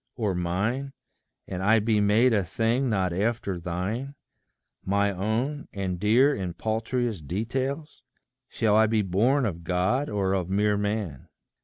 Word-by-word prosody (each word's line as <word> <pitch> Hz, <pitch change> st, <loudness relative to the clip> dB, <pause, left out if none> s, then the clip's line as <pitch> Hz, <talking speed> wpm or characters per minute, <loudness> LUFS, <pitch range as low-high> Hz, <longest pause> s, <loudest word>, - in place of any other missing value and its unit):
or 105 Hz, -5 st, -1 dB
mine, 100 Hz, +11 st, -1 dB, 0.5 s
And 90 Hz, -, -4 dB
I 105 Hz, +4 st, +4 dB
be 110 Hz, -1 st, +2 dB
made 110 Hz, +5 st, +4 dB
a 100 Hz, -3 st, +2 dB
thing 115 Hz, +8 st, 0 dB
not 95 Hz, -5 st, 0 dB
after 100 Hz, -1 st, -1 dB
thine 100 Hz, +11 st, -3 dB, 0.7 s
My 100 Hz, +1 st, +1 dB
own, 110 Hz, +10 st, -2 dB
and 95 Hz, -3 st, -3 dB
dear 120 Hz, +8 st, +4 dB
in 90 Hz, -6 st, -4 dB
paltriest 110 Hz, -, -2 dB
details? 130 Hz, -, -3 dB, 0.5 s
Shall 110 Hz, -3 st, +1 dB
I 110 Hz, 0 st, +5 dB
be 110 Hz, -1 st, +1 dB
born 115 Hz, +9 st, +2 dB
of 85 Hz, -5 st, -4 dB
God, 90 Hz, -, 0 dB
or 100 Hz, -2 st, 0 dB
of 95 Hz, -2 st, -1 dB
mere 105 Hz, +2 st, +2 dB
man? 105 Hz, -9 st, -3 dB
105 Hz, 145 wpm, -26 LUFS, 95-120 Hz, 0.7 s, I